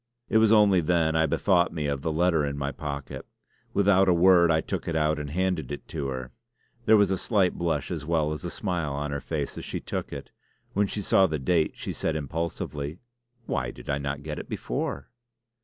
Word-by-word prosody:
It 110 Hz, -, +4 dB
was 110 Hz, -1 st, +4 dB
only 105 Hz, -4 st, +5 dB
then 80 Hz, -1 st, +2 dB
I 80 Hz, 0 st, +3 dB
bethought 90 Hz, -3 st, +2 dB
me 75 Hz, -2 st, -3 dB
of 70 Hz, -2 st, -1 dB
the 80 Hz, -, -1 dB
letter 80 Hz, -1 st, +2 dB
in 70 Hz, 0 st, -2 dB
my 70 Hz, 0 st, -2 dB
pocket. 70 Hz, -3 st, -6 dB, 0.5 s
Without 95 Hz, -1 st, +4 dB
a 90 Hz, -, +5 dB
word 85 Hz, -1 st, +6 dB
I 80 Hz, -1 st, +4 dB
took -, -, -4 dB
it 85 Hz, -, -1 dB
out 75 Hz, -1 st, +1 dB
and 75 Hz, -1 st, -5 dB
handed 90 Hz, -4 st, -1 dB
it 70 Hz, -, -6 dB
to 70 Hz, -4 st, -3 dB
her. 65 Hz, -1 st, -5 dB, 0.5 s
There 110 Hz, 0 st, +6 dB
was 100 Hz, -2 st, +3 dB
a 95 Hz, -, 0 dB
slight 100 Hz, -6 st, +2 dB
blush 80 Hz, -4 st, -1 dB
as 80 Hz, -4 st, -3 dB
well 80 Hz, -1 st, +1 dB
as 75 Hz, -, -7 dB
a 85 Hz, -, -3 dB
smile 85 Hz, -7 st, -2 dB
on 75 Hz, +1 st, -3 dB
her 70 Hz, 0 st, -3 dB
face 75 Hz, -4 st, -3 dB
as -, -, -8 dB
she -, -, -4 dB
took -, -, -5 dB
it. -, -, -8 dB, 0.4 s
When 100 Hz, 0 st, +2 dB
she 105 Hz, +1 st, -4 dB
saw 95 Hz, 0 st, +4 dB
the 80 Hz, -, -2 dB
date 80 Hz, +3 st, +1 dB
she -, -, -5 dB
said 80 Hz, -, -2 dB
impulsively: 75 Hz, 0 st, -4 dB, 0.5 s
"Why 65 Hz, -, -1 dB
did -, -, -7 dB
I 70 Hz, -, 0 dB
not 70 Hz, 0 st, -4 dB
get 75 Hz, 0 st, -5 dB
it -, -, -9 dB
before?" 70 Hz, 0 st, -4 dB
80 Hz, 220 wpm, -27 LUFS, 70-90 Hz, 0.5 s, word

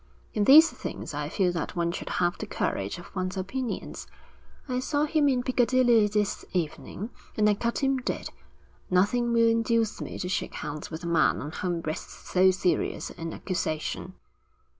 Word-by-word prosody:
In 210 Hz, -2 st, +1 dB
these 315 Hz, +6 st, +9 dB
things -, -, -6 dB
I -, -, -3 dB
feel 185 Hz, -3 st, +1 dB
that 170 Hz, 0 st, -4 dB
one 170 Hz, -1 st, 0 dB
should 175 Hz, -, -5 dB
have 175 Hz, -1 st, +1 dB
the -, -, -5 dB
courage 100 Hz, 0 st, -2 dB
of 175 Hz, -, -12 dB
one's 185 Hz, 0 st, -2 dB
opinions. 235 Hz, +7 st, -4 dB, 0.6 s
I 250 Hz, -1 st, -1 dB
saw 290 Hz, +3 st, +1 dB
him 300 Hz, -1 st, +3 dB
in 250 Hz, -2 st, +1 dB
Piccadilly 245 Hz, -3 st, +4 dB
this 210 Hz, 0 st, -1 dB
evening, 180 Hz, +5 st, -3 dB, 0.3 s
and 210 Hz, -1 st, +4 dB
I 210 Hz, -, +5 dB
cut 235 Hz, +6 st, -2 dB
him 270 Hz, 0 st, +3 dB
dead. 255 Hz, -, -3 dB, 0.6 s
Nothing 220 Hz, +7 st, +2 dB
will 230 Hz, 0 st, +4 dB
induce 230 Hz, -1 st, +1 dB
me -, -, -5 dB
to 180 Hz, -, -3 dB
shake 185 Hz, -, -2 dB
hands 150 Hz, +1 st, -5 dB
with 160 Hz, +1 st, -7 dB
a -, -, -3 dB
man 170 Hz, -1 st, +3 dB
on 150 Hz, -, -5 dB
whom 175 Hz, 0 st, -2 dB
rests 155 Hz, -1 st, -6 dB
so 185 Hz, +1 st, +5 dB
serious 185 Hz, -1 st, 0 dB
an 165 Hz, -1 st, -6 dB
accusation.' 175 Hz, 0 st, -3 dB
205 Hz, 175 wpm, -27 LUFS, 175-245 Hz, 0.6 s, these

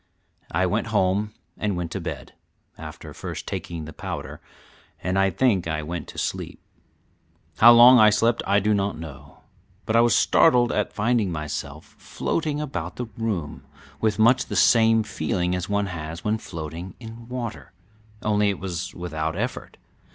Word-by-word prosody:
I -, -, +1 dB
went -, -, -1 dB
home 100 Hz, +3 st, +1 dB, 0.3 s
and 105 Hz, -4 st, -1 dB
went 85 Hz, -2 st, -4 dB
to -, -, -4 dB
bed, -, -, -6 dB, 0.4 s
after -, -, -10 dB
first -, -, -7 dB
taking 85 Hz, -3 st, -5 dB
the 80 Hz, -, -9 dB
powder, -, -, -6 dB, 0.6 s
and 95 Hz, +1 st, 0 dB
I 95 Hz, 0 st, +3 dB
think 95 Hz, -3 st, +1 dB
I 80 Hz, -1 st, -2 dB
went 85 Hz, +3 st, -5 dB
to -, -, -11 dB
sleep. -, -, -4 dB, 1.0 s
How 120 Hz, +2 st, +9 dB
long 120 Hz, +2 st, +9 dB
I 110 Hz, -1 st, +8 dB
slept 115 Hz, +3 st, +2 dB
I 100 Hz, +1 st, +4 dB
do 105 Hz, +2 st, +1 dB
not 100 Hz, 0 st, -1 dB
know, 75 Hz, -5 st, -11 dB, 0.4 s
but 110 Hz, -, -1 dB
I 115 Hz, -, +6 dB
was 120 Hz, -2 st, +4 dB
startled 120 Hz, -1 st, +4 dB
at 105 Hz, -, -1 dB
finding 110 Hz, -3 st, +1 dB
myself 75 Hz, -1 st, -5 dB
floating 155 Hz, -3 st, -2 dB
about 90 Hz, -, -4 dB
the 125 Hz, -, -4 dB
room 105 Hz, -10 st, -3 dB, 0.4 s
with 110 Hz, -2 st, +1 dB
much 120 Hz, +4 st, +4 dB
the -, -, -5 dB
same 115 Hz, -1 st, +5 dB
feeling 90 Hz, -3 st, -2 dB
as 90 Hz, +1 st, -3 dB
one 100 Hz, 0 st, +1 dB
has 85 Hz, -3 st, -6 dB
when 110 Hz, +1 st, 0 dB
floating 85 Hz, 0 st, -7 dB
in 115 Hz, 0 st, -10 dB
water, 115 Hz, -, -6 dB, 0.5 s
only 105 Hz, -1 st, +2 dB
it 100 Hz, -, -2 dB
was 90 Hz, -1 st, -5 dB
without 80 Hz, -2 st, -3 dB
effort. 120 Hz, +6 st, -4 dB
100 Hz, 165 wpm, -24 LUFS, 85-115 Hz, 1.0 s, How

